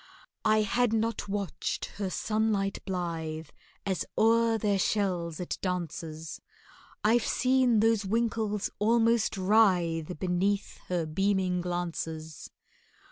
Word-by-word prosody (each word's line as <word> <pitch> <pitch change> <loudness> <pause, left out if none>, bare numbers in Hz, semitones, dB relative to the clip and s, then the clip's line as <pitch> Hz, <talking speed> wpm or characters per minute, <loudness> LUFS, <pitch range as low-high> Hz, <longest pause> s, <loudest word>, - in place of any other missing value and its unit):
I 215 0 +4
had 240 +2 +1
not 225 -1 -1
watched 200 -3 -2 0.2
her 195 - 0
sunlight 215 -1 0
blithe 165 -4 -3 0.4
As 190 -3 0
o'er 230 0 +4
their 205 -2 +1
shells 180 -5 0
it 180 - -4
dances— 165 -3 -4 0.6
I've 225 +2 +4
seen 255 -4 +3
those 225 -2 +3
winkles 215 0 -1
almost 230 0 +3
writhe 180 -5 +2
Beneath 190 +4 -1
her 175 -2 -1
beaming 185 +2 +1
glances. 165 -3 -4
195 Hz, 105 wpm, -29 LUFS, 175-220 Hz, 0.6 s, I